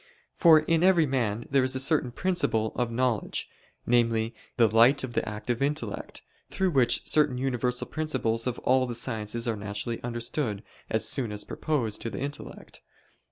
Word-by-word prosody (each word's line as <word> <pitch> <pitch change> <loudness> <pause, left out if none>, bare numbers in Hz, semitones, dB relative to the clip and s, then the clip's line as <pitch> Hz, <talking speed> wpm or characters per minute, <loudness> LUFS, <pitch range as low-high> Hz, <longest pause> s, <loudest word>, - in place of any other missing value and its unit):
For 160 -3 +6
in 165 +1 +1
every 180 -4 +5
man 120 -5 -1
there 135 -1 +3
is 130 0 +2
a - - 0
certain 140 -1 +2
principle 120 -8 0
of 120 -2 -1
knowledge, 120 -2 -1 0.4
namely 115 -1 +1 0.2
the 115 -2 +5
light 115 +6 +4
of 125 -2 -5
the 110 - -1
active 115 +3 -4
intellect, 145 +2 -3 0.3
through 190 -2 0
which 130 -5 +2
certain 150 -4 +2
universal 125 -1 -1
principles 130 -7 -1
of 125 - -2
all 130 0 +3
the 120 - -4
sciences 115 0 -1
are 115 - 0
naturally 105 +3 -4
understood 120 -2 -3 0.3
as 110 - +1
soon 125 -6 0
as 105 0 -4
proposed 125 -9 -2
to 115 - -2
the - - -7
intellect. 140 +2 -7
125 Hz, 165 wpm, -27 LUFS, 115-140 Hz, 0.4 s, For